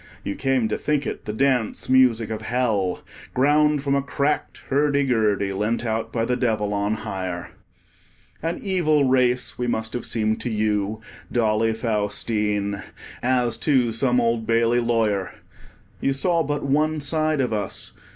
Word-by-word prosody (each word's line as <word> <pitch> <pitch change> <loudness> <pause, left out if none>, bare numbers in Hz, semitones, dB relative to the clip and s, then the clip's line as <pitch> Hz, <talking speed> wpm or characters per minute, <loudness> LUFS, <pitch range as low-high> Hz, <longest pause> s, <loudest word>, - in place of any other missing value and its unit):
You 100 - -3
came 135 -4 +1
to 110 - -2
think 150 -2 0
it - - -5
the 105 - -3
dance 125 0 0
music 125 -4 +4
of 110 0 -4
Hell, 110 -5 0 0.3
ground 150 +2 +3
from 140 -1 +1
a 140 - +2
cracked 140 +2 -2
hurdy 140 0 +2
gurdy, 105 -6 +1
lent 105 +4 -1
out 110 0 -2
by 115 -1 0
the 125 - 0
Devil 110 -4 0
on 100 +1 0
hire. 95 -5 -5 0.9
An 165 +2 -2
evil 170 -7 +2
race 130 -2 +1
we 125 - -1
must 110 -2 -2
have 120 - -3
seemed 110 -1 0
to 125 - -3
you, 105 -1 -1 0.3
Dolly 110 -1 +2
Faustine, 105 -2 -1 0.4
as 125 -2 +1
to 130 -6 +2
some 125 +2 +2
Old 115 -1 0
Bailey 115 +1 +3
lawyer. 115 -5 0 0.6
You 135 - +1
saw 170 +4 +1
but 145 -2 -2
one 155 +3 +1
side 155 +1 0
of 125 -4 0
us. 105 -1 -3
120 Hz, 155 wpm, -23 LUFS, 110-135 Hz, 0.9 s, music